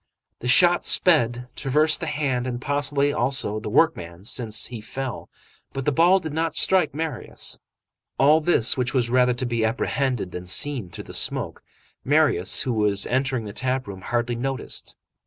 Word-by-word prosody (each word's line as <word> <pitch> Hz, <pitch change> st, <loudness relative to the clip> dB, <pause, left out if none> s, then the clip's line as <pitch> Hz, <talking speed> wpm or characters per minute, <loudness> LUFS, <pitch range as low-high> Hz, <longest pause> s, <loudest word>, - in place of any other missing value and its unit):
The 125 Hz, -, -6 dB
shot 175 Hz, +7 st, +5 dB
sped, 125 Hz, -8 st, +3 dB
traversed 150 Hz, +3 st, +1 dB
the 165 Hz, -, -4 dB
hand 135 Hz, -5 st, -1 dB
and 120 Hz, -1 st, -4 dB
possibly, 145 Hz, +1 st, 0 dB
also, 120 Hz, -6 st, 0 dB
the 105 Hz, -, -6 dB
workman, 95 Hz, -, 0 dB
since 110 Hz, -1 st, -1 dB
he 120 Hz, -3 st, -6 dB
fell, 130 Hz, +3 st, -6 dB, 0.4 s
but 135 Hz, -1 st, -5 dB
the 150 Hz, -, +2 dB
ball 170 Hz, +6 st, +4 dB
did 160 Hz, -5 st, -5 dB
not 160 Hz, 0 st, -2 dB
strike 175 Hz, -7 st, +1 dB
Marius. 155 Hz, -5 st, -4 dB, 0.6 s
All 150 Hz, +4 st, +4 dB
this, 150 Hz, -8 st, +3 dB
which 125 Hz, 0 st, -2 dB
was 120 Hz, -2 st, +1 dB
rather 125 Hz, -1 st, +3 dB
to 125 Hz, -, -2 dB
be 120 Hz, -2 st, -1 dB
apprehended 120 Hz, -2 st, -1 dB
than 90 Hz, 0 st, -7 dB
seen 120 Hz, +1 st, -1 dB
through -, -, -9 dB
the -, -, -12 dB
smoke, -, -, -1 dB, 0.4 s
Marius, 140 Hz, -, +2 dB
who 125 Hz, -, -2 dB
was 105 Hz, -2 st, +1 dB
entering 130 Hz, -2 st, -1 dB
the 105 Hz, -, -8 dB
tap 130 Hz, +2 st, -1 dB
room, 95 Hz, -2 st, -9 dB
hardly 120 Hz, +3 st, -2 dB
noticed. 135 Hz, +2 st, -5 dB
130 Hz, 170 wpm, -23 LUFS, 115-145 Hz, 0.6 s, shot